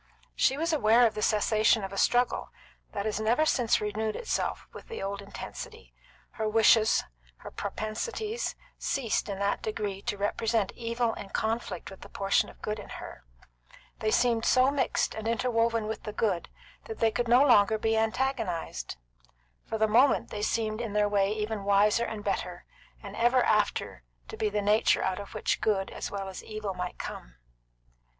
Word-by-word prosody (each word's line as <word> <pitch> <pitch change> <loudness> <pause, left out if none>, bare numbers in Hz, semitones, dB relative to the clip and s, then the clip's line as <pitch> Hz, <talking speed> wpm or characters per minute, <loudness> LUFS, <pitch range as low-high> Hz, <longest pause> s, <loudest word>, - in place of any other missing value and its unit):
She 270 - +2
was 330 +2 0
aware 235 -4 +5
of 220 - +2
the 215 - -4
cessation 215 0 +3
of 195 0 -5
a - - -6
struggle 245 0 +2 0.4
that 200 - -3
has 215 -1 -1
never 235 +8 +2
since 245 -7 +2
renewed 215 +1 -2
itself 475 - -2
with - - -11
the 460 - -6
old 200 +1 -3
intensity; 445 - -9 0.4
her 220 -1 -2
wishes, 220 0 +5 0.3
her - - -10
propensities, 430 - -3 0.2
ceased 240 -6 -1
in 195 - -3
that 200 +1 0
degree 205 -3 -3
to 205 - -3
represent 215 +1 0
evil 235 0 -1
in 195 - -8
conflict 220 -4 -3
with 190 - -12
the - - -11
portion 195 0 +1
of - - -17
good 210 0 -2
in - - -10
her; - - -10 0.7
they 215 - 0
seemed 235 0 +2
so 255 +3 +4
mixed 280 -2 0
and 220 0 -5
interwoven 230 -1 +1
with 220 +1 -4
the 210 - -6
good 195 -7 -1 0.4
that 445 - -7
they 225 - +2
could 240 +2 -1
no 245 +3 +6
longer 220 -5 +5
be 220 +1 0
antagonised; 220 - -1 0.7
for 220 - -2
the 220 0 +3
moment 245 +6 +3
they 210 - -4
seemed 220 +1 -1
in 225 -4 -4
their 210 0 +3
way 200 -1 +2
even 215 -1 -3
wiser 205 +3 +3
and 215 -3 -6
better, 180 -3 -3 0.4
and 200 -1 -8
ever 240 +2 +3
after 210 - 0 0.3
to - - -7
be 215 - 0
the 205 0 -1
nature 210 +3 +3
out 190 0 -1
of 200 - -9
which - - -1
good 195 -3 0
as - - -5
well 195 -1 -4
as 190 - -8
evil 215 -2 -5
might 180 -1 -5
come. - - -7
215 Hz, 180 wpm, -28 LUFS, 205-235 Hz, 0.7 s, no